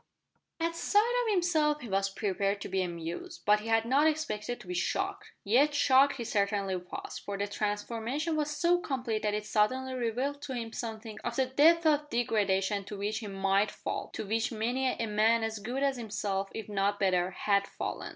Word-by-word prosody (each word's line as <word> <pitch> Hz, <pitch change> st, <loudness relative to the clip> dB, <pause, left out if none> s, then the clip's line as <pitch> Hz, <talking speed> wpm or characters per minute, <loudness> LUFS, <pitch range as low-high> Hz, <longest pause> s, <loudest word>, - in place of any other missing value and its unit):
At 335 Hz, 0 st, -1 dB
sight 415 Hz, +7 st, +2 dB
of -, -, +2 dB
himself 315 Hz, -6 st, +2 dB
he 240 Hz, -, -7 dB
was 195 Hz, -1 st, +1 dB
prepared 200 Hz, 0 st, -1 dB
to -, -, -4 dB
be 190 Hz, -, 0 dB
amused, 170 Hz, 0 st, -5 dB
but 210 Hz, 0 st, +5 dB
he 215 Hz, -, -8 dB
had 225 Hz, 0 st, +3 dB
not 275 Hz, +6 st, +4 dB
expected 245 Hz, -7 st, -2 dB
to -, -, -12 dB
be 180 Hz, -, -3 dB
shocked! 390 Hz, -, -2 dB
Yet 275 Hz, +8 st, +3 dB
shocked 280 Hz, 0 st, +5 dB
he 245 Hz, -, -4 dB
certainly 200 Hz, -3 st, 0 dB
was, 180 Hz, 0 st, -6 dB
for 200 Hz, -1 st, -5 dB
the 200 Hz, -, 0 dB
transformation 225 Hz, +9 st, -2 dB
was 300 Hz, -1 st, 0 dB
so 340 Hz, +4 st, +2 dB
complete 250 Hz, -9 st, -2 dB
that 210 Hz, -1 st, 0 dB
it 210 Hz, 0 st, -3 dB
suddenly 255 Hz, +5 st, +1 dB
revealed 255 Hz, +4 st, -2 dB
to 280 Hz, -3 st, -5 dB
him 230 Hz, -2 st, -5 dB
something 220 Hz, -2 st, -6 dB
of -, -, -3 dB
the 265 Hz, -, +2 dB
depth 315 Hz, +6 st, +4 dB
of 295 Hz, -1 st, +3 dB
degradation 205 Hz, -4 st, +1 dB
to 205 Hz, +1 st, -7 dB
which 210 Hz, +2 st, -2 dB
he 220 Hz, -, -6 dB
might 195 Hz, +1 st, +1 dB
fall -, -, -5 dB
to -, -, -4 dB
which 225 Hz, +4 st, 0 dB
many 240 Hz, +4 st, 0 dB
a 230 Hz, -, -2 dB
man 220 Hz, +2 st, +3 dB
as 220 Hz, -1 st, -2 dB
good 245 Hz, +7 st, -3 dB
as 275 Hz, -2 st, +1 dB
himself, 200 Hz, -3 st, -2 dB
if 220 Hz, -, -5 dB
not 205 Hz, 0 st, 0 dB
better, 185 Hz, -2 st, +2 dB
had 200 Hz, +1 st, +1 dB
fallen. -, -, -5 dB
225 Hz, 200 wpm, -30 LUFS, 200-275 Hz, -, but